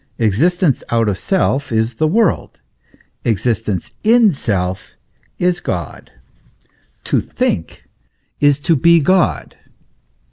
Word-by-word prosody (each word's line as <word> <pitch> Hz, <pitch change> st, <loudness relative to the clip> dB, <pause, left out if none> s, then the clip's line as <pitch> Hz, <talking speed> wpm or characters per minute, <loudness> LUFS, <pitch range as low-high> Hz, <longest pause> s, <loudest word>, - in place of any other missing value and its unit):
Existence 145 Hz, -, +1 dB
out 115 Hz, -1 st, +1 dB
of 100 Hz, -, 0 dB
self 140 Hz, -, -1 dB
is 110 Hz, +1 st, 0 dB
the 155 Hz, -, +1 dB
world, 205 Hz, +3 st, 0 dB, 0.6 s
exist 115 Hz, 0 st, -1 dB
ence 100 Hz, +4 st, -3 dB
in 225 Hz, -3 st, +4 dB
self 95 Hz, -7 st, -3 dB, 0.4 s
is 180 Hz, 0 st, 0 dB
God. 85 Hz, -3 st, -5 dB, 0.9 s
To -, -, 0 dB
think 80 Hz, -, -3 dB, 0.6 s
is 145 Hz, -1 st, +3 dB
to 165 Hz, -, +2 dB
be 170 Hz, +4 st, +4 dB
God. 185 Hz, +3 st, +1 dB
135 Hz, 110 wpm, -17 LUFS, 110-175 Hz, 0.9 s, in